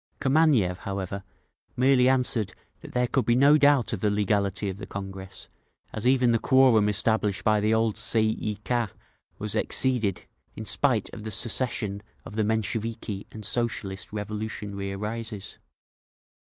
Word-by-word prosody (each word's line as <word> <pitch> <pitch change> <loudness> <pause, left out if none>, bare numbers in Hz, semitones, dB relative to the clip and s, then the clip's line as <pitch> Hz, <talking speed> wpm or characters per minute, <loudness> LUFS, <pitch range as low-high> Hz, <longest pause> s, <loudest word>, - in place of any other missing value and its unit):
Kameniev, 130 - +3
however, 100 0 -5 0.5
merely 130 0 +4
answered 125 -6 +1 0.2
that - - -12
there 125 0 +2
could 130 +1 +1
be 120 - +4
no 140 +4 +6
doubt 145 -5 +4
of 105 - -2
the 105 - +1
legality 100 0 0
of 95 -1 -4
the 95 -2 -8
Congress, 95 -1 -6 0.5
as 110 +3 -2
even 125 -2 +4
the 115 - +2
quorum 125 -6 +4
established 105 -1 +1
by 110 -1 +3
the 105 +1 +1
old 110 -1 +1
Tsay 115 0 +2 0.2
ee 105 -1 -2
Kah 120 -3 0 0.5
was - - -3
exceeded—in 110 -3 -1
spite 120 -2 +1
of 110 - -8
the 110 - -5
secession 110 -2 0 0.2
of 105 - -9
the 110 - +1
Mensheviki 110 -1 -2
and 110 -1 -8
Socialist 105 -4 -2
Revolution 105 0 -5
arises…. 105 +2 -5
110 Hz, 145 wpm, -26 LUFS, 100-120 Hz, 0.5 s, no